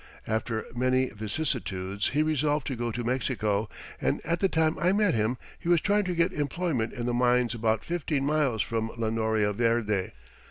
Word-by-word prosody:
After 110 0 -2
many 130 +1 +2
vicissitudes 105 -4 -2
he 150 +2 +2
resolved 150 -2 +1
to 130 - -2
go 120 0 -2
to 120 +2 -3
Mexico, 110 -4 0 0.3
and - - +1
at 170 +1 0
the 195 - +2
time 160 -2 +1
I 175 +4 +3
met 205 -2 +3
him 110 +3 +1 0.2
he 170 - -4
was 175 -1 +5
trying 205 +3 +2
to 180 -1 -1
get 170 +2 +2
employment 145 -5 -1
in 120 - -4
the 120 - 0
mines 125 -1 +3
about 110 -1 0
fifteen 155 -5 -1
miles 145 -7 +1
from 115 -1 -2
La 110 -1 -1
Noria 110 -2 +1
Verde. 110 -3 +1
125 Hz, 185 wpm, -28 LUFS, 110-155 Hz, 0.3 s, was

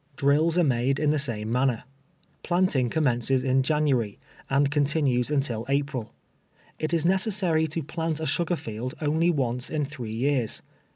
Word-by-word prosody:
Drills 150 +5 +2
are 175 - +4
made 130 -1 +1
in 150 -1 +2
tlie 155 - +1
same 115 -6 -1
manner. 125 -1 +1 0.6
Planting 175 -9 +1
commences 130 -2 +1
in 130 0 +2
January, 135 -7 0 0.3
and 140 +1 +2
con 145 -1 +2
tinues 140 -4 +1
until 135 -6 -1
April. 140 -4 -1 0.7
It 155 - -2
is 165 -2 +1
necessary 185 -4 +2
to 160 +1 -3
plant 160 +1 -3
a 160 - -3
sugar 170 +2 0
field 115 -2 -6
only 160 +3 +1
once 125 -6 -1
in 150 -2 -1
three 125 -6 -7
years. 125 -2 0
140 Hz, 160 wpm, -26 LUFS, 125-160 Hz, 0.7 s, are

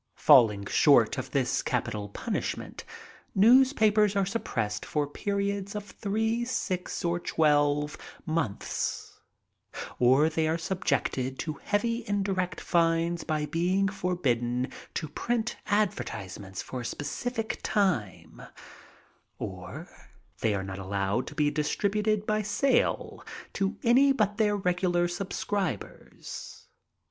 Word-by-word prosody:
Falling 110 -9 +6
short - - +4
of - - -5
this - - +1
capital 105 -1 -2
punishment, - - -4 0.5
newspapers 215 -2 +5
are 200 -1 +2
suppressed 115 - -2
for 150 -1 -1
periods 200 +5 -2
of 205 -1 -7
diree, 220 +3 0
six, 185 -9 -3
or 170 0 +1
twelve 150 -2 +2 0.3
months, 155 -11 -3 0.8
or 130 +5 +5
they 160 0 0
are 160 +1 +1
subjected 150 -7 -1
to 155 -3 -4
heavy 230 +3 0
indirect 195 -3 -1
fines 170 0 +1
by 155 -1 -1
being 175 +5 +1
forbidden 130 - -1 0.2
to 155 - -2
print 235 +9 -2
advertisements 100 - -2
for 130 - -6
a - - -5
^>eci 150 - -4
fied 225 +1 -3
time, 175 - -1 1.0
or - - -7 0.5
they 110 -2 +1
are 95 - -2
not 95 0 -6
allowed 100 +4 -1
to 145 - -8
be 150 -1 +2
distributed 205 +7 0
by 215 0 +1
sale 215 +7 0 0.3
to 195 0 -1
any 265 +4 +5
but 210 -6 +1
their 210 -2 +2
regular 180 -2 +1
subscribers. 190 0 -5
175 Hz, 115 wpm, -28 LUFS, 145-205 Hz, 1.0 s, Falling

